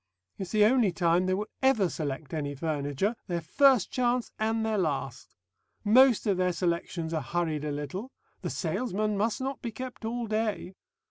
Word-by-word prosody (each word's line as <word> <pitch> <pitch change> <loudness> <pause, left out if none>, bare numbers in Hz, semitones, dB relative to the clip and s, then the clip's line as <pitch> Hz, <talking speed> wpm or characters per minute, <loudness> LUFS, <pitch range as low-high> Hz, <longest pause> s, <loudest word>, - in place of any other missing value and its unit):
It's 190 -2 -4
the 210 -1 +5
only 230 -3 +4
time 175 +1 +2
they 185 - +2
will 210 +2 -2 0.2
ever 265 -8 +4
select 150 -3 -4
any 145 -2 -3
furniture, 150 - -1
their 175 -1 -1
first 255 - +4
chance 245 -1 0
and 220 +1 0
their 220 -2 0
last. 135 -6 -3 0.5
Most 245 +2 +5
of 200 -4 +2
their 180 -1 +1
selections 170 -1 -2
are 160 - 0
hurried 155 +1 -2
a 150 - -2
little. 150 - -5 0.3
The - - -3
salesman 215 -3 -1
must 215 +5 0
not 270 +1 -3
be 235 - -4
kept 255 +2 -8
all 235 +2 -2
day.... 215 -4 -2
190 Hz, 175 wpm, -28 LUFS, 160-225 Hz, 0.5 s, the